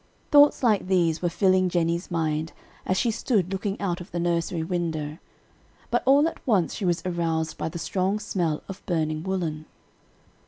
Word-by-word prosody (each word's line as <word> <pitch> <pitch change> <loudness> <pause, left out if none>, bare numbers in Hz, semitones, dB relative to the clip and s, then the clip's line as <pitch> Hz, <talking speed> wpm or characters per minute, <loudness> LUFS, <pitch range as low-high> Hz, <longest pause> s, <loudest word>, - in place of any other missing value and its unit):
Thoughts 290 -1 +6
like 215 -6 +2
these 170 -4 +2
were 175 - +1
filling 185 +1 +3
Jennie's 170 0 0
mind 160 -2 -1 0.3
as 185 - +1
she 235 - +2
stood 210 -5 0
looking 195 +1 -3
out 180 -3 -2
of 175 - -10
the 175 - -4
nursery 170 -1 0
window; 160 -3 -3 0.7
but 240 - +2
all 285 +3 +6
at - - -5
once 195 -8 +2
she 205 - -4
was 175 -1 0
aroused 165 -3 -1
by - - -2
the 165 - -6
strong 190 +4 -1
smell 175 -7 -2
of 195 - -9
burning 155 -3 0
woolen. 165 -4 -3
175 Hz, 170 wpm, -25 LUFS, 165-195 Hz, 0.7 s, Thoughts